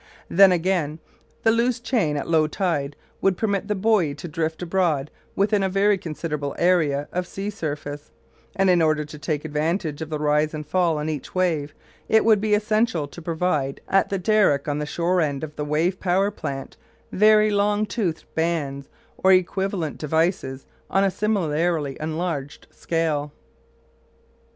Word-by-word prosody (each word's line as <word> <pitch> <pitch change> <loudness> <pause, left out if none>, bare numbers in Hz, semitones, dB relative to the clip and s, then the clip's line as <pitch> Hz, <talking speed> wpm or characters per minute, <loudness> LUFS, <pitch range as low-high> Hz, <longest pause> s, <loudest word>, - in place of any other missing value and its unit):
Then, 195 +1 +7
again, 170 -4 0 0.5
the 225 - +5
loose 235 +1 +1
chain 225 - 0
at - - -4
low 160 -2 +3
tide 150 -4 -2 0.3
would 195 -2 +2
permit 200 -3 -1
the 210 - 0
buoy 190 -7 +2
to 150 +4 -8
drift 160 +1 -3
abroad 165 -6 0 0.2
within 205 +1 +2
a 190 - +1
very 200 +2 +3
considerable 155 -5 -4
area 155 -5 +2
of 180 0 -2
sea 200 +2 -4
surface, 145 -5 -5 0.5
and 195 0 +2
in 175 -2 +4
order 155 -1 +2
to 150 0 -11
take 150 +1 -3
advantage 155 +1 -2
of 160 - -5
the 155 - -2
rise 150 +1 +1
and 150 0 -6
fall 170 0 +1
on 150 +1 -3
each 150 0 -5
wave 160 -5 0 0.3
it 220 0 +4
would 215 -3 +5
be 210 -1 +3
essential 210 -7 +1
to 170 - -11
provide 160 -5 -1
at 195 0 +2
the 195 - -1
derrick 185 -7 +2
on 145 0 -1
the 150 - -3
shore 175 +3 +1
end 145 -3 -1
of 155 -1 -6
the 150 - -3
wave 160 +5 0
power 190 +2 +1
plant 135 -8 -6 0.3
very 215 +1 +5
long 205 +1 +2
toothed 190 -8 -2
bands 150 -4 -2 0.3
or 190 - +4
equivalent 185 -2 +1
devices 160 -3 -1 0.2
on 195 - +2
a 195 - +2
similarly 165 -8 0
enlarged 155 -2 -4
scale. 155 -3 -1
165 Hz, 165 wpm, -23 LUFS, 150-195 Hz, 0.5 s, Then